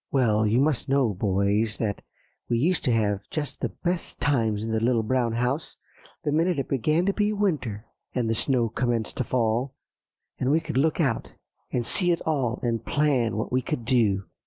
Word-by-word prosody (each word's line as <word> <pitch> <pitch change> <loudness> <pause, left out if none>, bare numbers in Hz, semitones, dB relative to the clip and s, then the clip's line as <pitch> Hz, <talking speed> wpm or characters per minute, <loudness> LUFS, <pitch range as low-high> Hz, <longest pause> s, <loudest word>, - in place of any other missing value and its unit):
"Well, 110 -5 +3
you 115 +4 +3
must 140 -3 +1
know, 135 -6 +2
boys, 100 +3 +1
that 105 -3 -2 0.5
we 120 - +2
used 170 +9 +1
to 125 - +3
have 105 -3 +1
just 150 -2 -4
the - - 0
best 175 -1 -3
times 110 -7 +1
in 115 - -3
The 110 - +1
Little 115 0 +2
Brown 120 0 0
House 125 +6 -2 0.5
the 145 - 0
minute 165 +3 +2
it 135 - -2
began 155 +7 +1
to 200 - +2
be 210 0 +1
winter, 150 - -1 0.3
and 125 -3 0
the 115 - +1
snow 120 +1 +1
commenced 115 -1 -1
to - - +1
fall, 120 +2 0 0.6
and 130 - 0
we 155 +3 +4
could 160 -1 -6
look 155 +5 +2
out 135 -8 0 0.4
and 120 -2 -1
see 180 - +3
it 170 - 0
all, 130 -6 0
and 115 -2 -1
plan 130 -7 +1
what 110 - -3
we 130 +1 +2
could 125 -2 -4
do." 110 -6 +2
125 Hz, 195 wpm, -26 LUFS, 110-150 Hz, 0.6 s, we